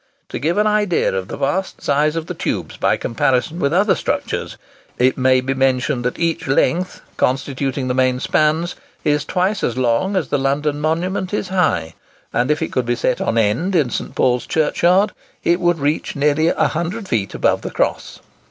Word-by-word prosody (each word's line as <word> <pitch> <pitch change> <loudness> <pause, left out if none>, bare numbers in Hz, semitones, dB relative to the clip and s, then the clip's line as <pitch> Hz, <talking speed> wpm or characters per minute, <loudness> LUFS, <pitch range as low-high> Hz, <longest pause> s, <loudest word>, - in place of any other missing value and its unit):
To - - -4
give 165 +6 0
an 210 - +3
idea 210 -4 +2
of 95 -1 -3
the - - -6
vast 180 +8 -2
size 150 +2 +2
of 165 -1 -2
the - - -5
tubes - - -3
by - - +1
comparison 135 +6 0
with 140 - +1
other 195 +4 +3
structures, - - -3 0.4
it 130 +1 +3
may 130 -1 +3
be 130 +1 -1
mentioned 130 -1 +1
that 125 - -1
each 170 -2 -1
length 175 +6 +1 0.2
constituting 135 0 -1
the 125 - 0
main 130 0 +2
spans 155 +5 +1 0.3
is 150 -1 +1
twice 190 +3 0
as 125 - -1
long 130 - +1
as 185 -5 -1
London 145 +1 0
Monument 180 +5 -1
is 190 - -3
high; 180 - +1 0.4
and 120 +3 +1
if 150 +1 +1
it - - -4
could 125 -2 -1
be 120 - +1
set 125 +1 0
on 115 - 0
end 120 - +1
in 145 -8 +2
St. - - -4
Paul's 125 -1 +1
Churchyard, 175 +5 +2 0.3
it 175 +1 +2
would 175 -1 +2
reach 145 +1 -1
nearly 150 +2 +2
100 175 +6 -1
feet 105 - -1
above - - +1
the - - -5
cross. - - -2
150 Hz, 185 wpm, -19 LUFS, 130-175 Hz, 0.4 s, an